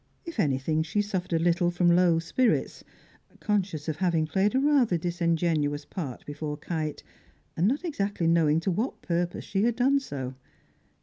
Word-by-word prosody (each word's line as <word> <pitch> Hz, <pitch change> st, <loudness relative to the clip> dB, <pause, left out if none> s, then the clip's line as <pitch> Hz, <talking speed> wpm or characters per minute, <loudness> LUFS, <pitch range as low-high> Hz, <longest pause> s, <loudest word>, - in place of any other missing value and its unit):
If 335 Hz, -8 st, -7 dB
anything, 150 Hz, -1 st, +1 dB
she 165 Hz, +6 st, -2 dB
suffered 190 Hz, -4 st, -3 dB
a -, -, +4 dB
little 175 Hz, +1 st, +2 dB
from 175 Hz, 0 st, +3 dB
low 175 Hz, -2 st, +4 dB
spirits, 225 Hz, +9 st, 0 dB, 0.6 s
conscious 190 Hz, -8 st, -1 dB
of 155 Hz, -1 st, -2 dB
having 170 Hz, -3 st, +1 dB
played 190 Hz, -, +1 dB
a -, -, +4 dB
rather 270 Hz, -10 st, +3 dB
disingenuous 165 Hz, -4 st, 0 dB
part 145 Hz, -10 st, -6 dB
before 150 Hz, 0 st, -5 dB
Kite, 155 Hz, -1 st, -4 dB, 0.5 s
and 170 Hz, +4 st, +2 dB
not 280 Hz, +9 st, 0 dB
exactly 200 Hz, -, -2 dB
knowing 165 Hz, -2 st, +3 dB
to 190 Hz, -, 0 dB
what 220 Hz, +9 st, -3 dB
purpose 175 Hz, 0 st, -2 dB
she 195 Hz, -1 st, -1 dB
had 235 Hz, +1 st, +2 dB
done 270 Hz, +3 st, +3 dB
so. 135 Hz, -, -6 dB
175 Hz, 165 wpm, -27 LUFS, 155-205 Hz, 0.6 s, a